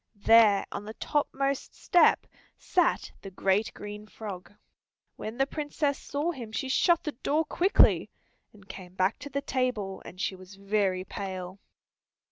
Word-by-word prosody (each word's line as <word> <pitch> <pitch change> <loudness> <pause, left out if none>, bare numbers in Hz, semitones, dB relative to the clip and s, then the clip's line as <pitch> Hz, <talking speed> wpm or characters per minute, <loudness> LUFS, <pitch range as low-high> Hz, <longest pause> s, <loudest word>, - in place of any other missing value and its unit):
There 210 -1 +5
on - - -5
the 215 +1 -8
top 295 -1 0
most 275 0 -2
step 355 -3 +4 0.3
sat 355 -3 +1
the 195 - -8
great 195 +3 +1
green 210 +1 -8
frog. 200 -5 -8 0.6
When 220 +2 -6
the 270 - +3
Princess 290 0 -2
saw 295 +4 -2
him 240 -8 -8
she 245 +5 -3
shut 340 +5 +3
the 300 - -2
door 295 +5 0
quickly, 370 +6 +3 0.4
and 200 -2 -19
came 185 -2 -10
back 185 +3 +1
to 285 - -8
the 280 0 -3
table, 245 -7 -2
and 180 - -11
she 190 - -1
was 185 +1 -13
very 195 -2 0
pale. 185 -1 -6
215 Hz, 155 wpm, -28 LUFS, 195-280 Hz, 0.6 s, There